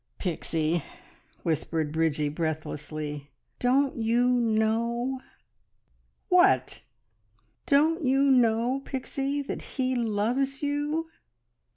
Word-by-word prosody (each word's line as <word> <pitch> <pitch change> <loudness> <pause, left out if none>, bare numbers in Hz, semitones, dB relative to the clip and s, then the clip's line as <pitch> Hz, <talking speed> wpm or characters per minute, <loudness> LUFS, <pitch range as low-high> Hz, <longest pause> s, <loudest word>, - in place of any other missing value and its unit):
"Pixie," 165 -3 -1 0.6
whispered 160 -1 -1
Bridgie 155 -2 +1
breathlessly, 150 -2 -4 0.3
"don't 265 +2 +2
you 235 +2 +2
know?" 235 +2 +1 1.1
"What?" - - +3 0.9
"Don't 315 +4 +3
you 270 +1 +3
know, 250 -1 +3
Pixie, 275 +2 -3
that - - -5 0.2
he 260 -1 +1
loves 245 +4 0
you?" 295 +3 -1
235 Hz, 80 wpm, -27 LUFS, 165-270 Hz, 1.1 s, What